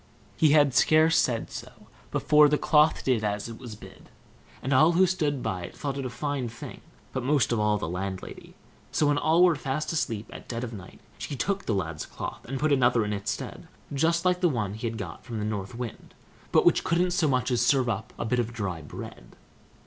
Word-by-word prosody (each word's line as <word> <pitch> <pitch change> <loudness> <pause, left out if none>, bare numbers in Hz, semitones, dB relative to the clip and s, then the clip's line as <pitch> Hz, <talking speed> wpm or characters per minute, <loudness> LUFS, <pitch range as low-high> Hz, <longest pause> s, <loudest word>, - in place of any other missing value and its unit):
He 155 - +4
had 145 -3 +5
scarce 160 +4 +4
said 115 -3 +1
so - - -7 0.4
before 150 0 +5
the 150 - +2
cloth 150 +1 +3
did 125 -5 +1
as 105 0 -2
it 115 -1 -9
was 120 -4 -8
bid; - - -14 0.5
and 135 - 0
all 155 +6 +5
who 185 +3 +5
stood 150 -8 -1
by 90 -2 -3
thought 140 -2 -3
it 135 -2 -3
a - - -6
fine 140 -2 -3
thing, 115 - -9 0.3
but 130 - -2
most 140 -1 +2
of 120 - +1
all 105 0 +2
the 100 - -4
landlady. 95 +2 -6 0.4
So, 150 - +2
when 145 0 +2
all 160 +4 +4
were 175 -3 +5
fast 145 +3 -3
asleep 115 -9 -2
at - - -10
dead 115 0 -4
of 120 -2 -5
night, 95 -3 -11 0.2
she 145 - -4
took 200 +9 -2
the 110 - +1
lad's 80 -5 -3
cloth, - - -7
and 135 +2 -4
put 150 +1 +2
another 120 -4 +3
in 105 - -2
its 100 0 -3
stead, - - -5 0.3
just 165 +5 +1
like 180 0 +2
the 175 - +4
one 105 -8 -2
he 110 +2 -4
had 115 0 -4
got - - -7
from 120 -3 -6
the 105 - -2
North 105 0 -4
Wind, 120 -2 -7 0.4
but - - +4
which - - +4
couldn't 175 +2 +1
so 175 -3 +2
much 130 -2 +1
as 120 -2 +2
serve 130 0 +3
up 110 -3 -3
a - - -3
bit 125 +2 0
of 120 -1 -1
dry 100 -8 -4
bread. 65 -4 -10
125 Hz, 225 wpm, -27 LUFS, 110-150 Hz, 0.5 s, had